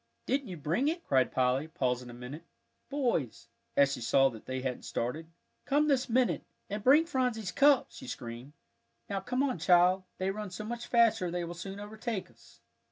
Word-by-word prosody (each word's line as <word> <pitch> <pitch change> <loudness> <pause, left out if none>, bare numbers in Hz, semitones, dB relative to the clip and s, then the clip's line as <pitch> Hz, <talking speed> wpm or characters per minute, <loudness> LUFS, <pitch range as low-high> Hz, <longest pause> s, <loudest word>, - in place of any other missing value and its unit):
"Didn't 270 0 0
you 180 -3 -6
bring 165 - 0
it?" 335 +3 -1
cried 130 -2 +2
Polly, 130 +3 +1
pausing 125 -5 -2
a - - -9
minute. 125 +6 -8 0.5
"Boys," 160 - -1 0.3
as 140 -1 +5
she 125 - -5
saw 135 +3 +4
that 115 -4 -12
they 130 0 -3
hadn't 130 -1 -3
started, 150 +8 -3 0.4
"come 295 +2 +2
this 270 -3 +2
minute, 250 +1 +2 0.3
and 205 0 -3
bring 290 +6 +6
Phronsie's 250 - -1
cup," 280 -1 +5
she 260 - -10
screamed. 125 - -7 0.6
"Now 195 - 0
come 250 +5 -1
on, 260 -10 -1
child; 180 +2 +5 0.2
they 190 +1 0
run 210 0 -5
so 185 +4 -6
much 235 +2 -5
faster 225 -6 +3
they 175 0 -2
will 170 0 -5
soon 195 +3 -7
overtake 215 0 -5
us." - - -21
185 Hz, 185 wpm, -31 LUFS, -, 0.6 s, bring